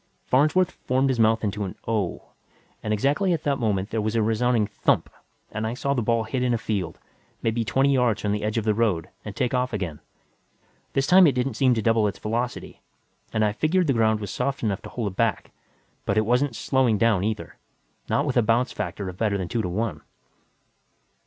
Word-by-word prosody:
Farnsworth 155 +7 +3
formed 130 +2 0
his 130 -3 0
mouth 110 0 +3
into 105 0 -1
an 95 - -5
"Oh" 105 -6 -2 0.5
and 105 - -3
exactly 145 - +2
at 160 - -2
that 140 -2 0
moment 105 -3 -1
there 110 - 0
was 110 +2 -2
a 115 - +3
resounding 115 +1 +2
thump - - 0 0.4
and 110 +1 -2
I 115 - -3
saw 140 +2 -1
the 125 - 0
ball 115 0 +1
hit 125 +3 -3
in 125 -1 +2
a - - 0
field, 95 -7 -3 0.5
maybe 115 +1 0
twenty 135 +5 +2
yards 125 -5 +1
from 105 - 0
the 105 0 -1
edge 110 +1 -1
of 115 - +1
the 110 - +3
road, 100 -7 0
and - - -7
take 125 - -1
off 125 -1 0
again. 90 -8 -3 0.9
This 135 - +1
time 180 +3 +7
it 140 - +3
didn't 125 +2 0
seem 130 -3 +3
to 110 - -1
double 115 -1 +3
its 100 - -4
velocity, 120 +3 -4 0.5
and 110 -1 +1
I 105 - 0
figured 170 - +1
the 140 - +2
ground 110 -2 +2
was 100 - -5
soft 140 -2 -2
enough 105 -1 -1
to - - -9
hold 110 -5 -3
it - - -15
back 115 -2 0 0.5
but 100 - 0
it 110 - +3
wasn't 125 +2 +1
slowing 130 -4 +2
down 105 -3 +2
either, 110 0 -3 0.5
not 140 - +1
with 135 -4 -1
a - - +6
bounce 115 +3 +2
factor 100 -1 -4
of 90 -1 -7
better 105 -3 +1
than 90 -3 -4
two 115 - 0
to 90 - -3
one. 95 -4 -2
115 Hz, 215 wpm, -25 LUFS, 105-125 Hz, 0.9 s, time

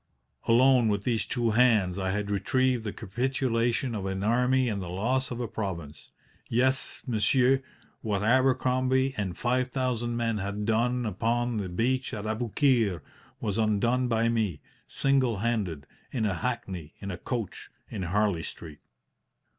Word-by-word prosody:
Alone, 125 0 +5
with 100 -2 0
these 115 -1 0
two 120 -2 0
hands, 110 -6 +3
I 95 0 -1
had 105 +1 -2
retrieved 130 +3 +1
the 105 - -2
capitulation 120 +2 -1
of 100 -3 -3
an 95 0 -3
army 125 +3 +3
and 105 -4 -2
the 90 - -6
loss 125 +9 0
of 120 - -5
a 120 - -2
province. 85 -9 -6 0.4
Yes, 130 +3 +1
monsieur, 125 +3 +3 0.4
what 105 -3 -1
Abercrombie 130 +2 +2
and 95 -5 -3
5,000 125 -1 0
men 115 -2 0
had 100 +1 -3
done 120 +3 +1
upon 115 +3 0
the 100 -3 -3
beach 125 +6 0
at 105 0 -5
Aboukir 110 - +1 0.4
was 105 0 -2
undone 115 +4 +2
by 115 -1 +2
me, 110 -9 0 0.3
single 135 -5 +1
handed, 100 -9 -1 0.3
in 115 -4 -1
a 100 - +1
hackney 95 -6 -4 0.3
coach 120 -6 -4 0.2
in 105 - -6
Harley 95 0 +1
Street. 80 -1 -8
115 Hz, 140 wpm, -28 LUFS, 100-125 Hz, 0.4 s, Alone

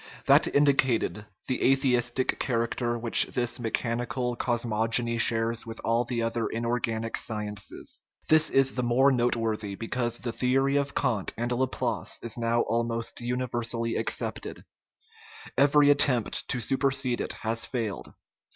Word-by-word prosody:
That - - +5
indicated 130 -7 +2 0.2
the 130 - -2
atheistic 130 -2 +1
character 120 0 -1
which 115 0 +5
this 120 -1 -2
mechanical 120 +1 -2
cosmogony 115 0 +1
shares 115 0 +1
with 115 -1 -8
all 115 +1 +1
the 120 -1 -2
other 115 0 -1
inorganic 115 -1 -2
sciences. 105 -2 -4 0.3
This 155 0 +5
is 135 0 +3
the 125 - -2
more 125 +3 +3
noteworthy 115 -5 -1
because 120 +2 -2
the 120 - -4
theory 135 +3 +1
of 140 0 -2
Kant 115 -8 -1
and 120 +2 -2
Laplace 125 +1 -1
is 115 - -2
now 115 0 +1
almost 115 0 -2
universally 120 -1 -2
accepted; - - -3 0.9
every 145 +1 +5
attempt 125 -6 +1
to 125 - -2
supersede 135 +1 0
it - - -3
has 115 +1 -1
failed. 115 -6 -4
120 Hz, 130 wpm, -27 LUFS, 115-130 Hz, 0.9 s, That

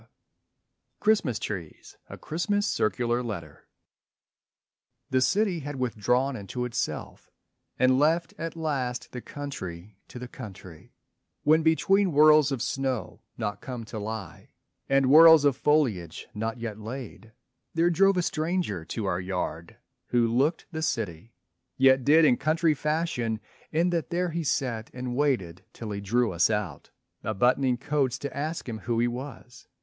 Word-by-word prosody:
_ - - -22 1.0
CHRISTMAS 205 - +2
TREES 90 -9 -7
(A - - -8
Christmas 205 +6 -1
Circular 120 - 0
Letter) 115 -4 -7 1.4
The 130 0 +3
city 195 +4 +2
had 145 -1 -6
withdrawn 125 +2 0
into 120 +3 -4
itself 125 -1 -4 0.5
And 130 +1 +4
left 165 +4 +2
at 165 0 -4
last 135 -7 -3
the 125 - -6
country 100 -11 -7
to - - -10
the 125 0 -6
country; 95 -9 -11 0.5
When 155 +2 +5
between 180 +4 +3
whirls 150 -1 +6
of 135 -4 -2
snow 130 -3 -3 0.2
not 105 -3 -3
come 125 -3 -6
to 110 -1 -6
lie 105 -4 -7 0.4
And 135 0 +4
whirls 160 +2 +8
of 140 -3 +4
foliage 115 - 0
not 110 +2 -3
yet 115 -3 -5
laid, 115 0 -8 0.4
there 170 +2 +3
drove 195 +2 +4
A 180 - +2
stranger 160 - -1
to 110 +4 -4
our 90 -2 0
yard, 90 -3 -4 0.3
who 120 -1 +2
looked 135 +8 +1
the 160 -2 -4
city, 110 - -3 0.4
Yet 130 0 +5
did 155 +4 +6
in 125 -5 +4
country 160 +1 +2
fashion 150 -7 -1 0.3
in 170 +3 +2
that 170 -2 -1
there 175 0 -1
He 165 +1 -2
sat 115 -6 -1
and 125 -1 -4
waited 110 - 0
till 110 -2 -7
he 100 0 -4
drew 115 +3 +1
us 85 +3 +3
out 105 -9 -3 0.3
A 110 - -2
buttoning 125 +4 +2
coats 140 -1 0
to 140 - -6
ask 155 +2 -3
him 110 -2 -5
who 115 0 -1
he 120 - +3
was. 125 0 -8
130 Hz, 150 wpm, -27 LUFS, 110-155 Hz, 1.4 s, whirls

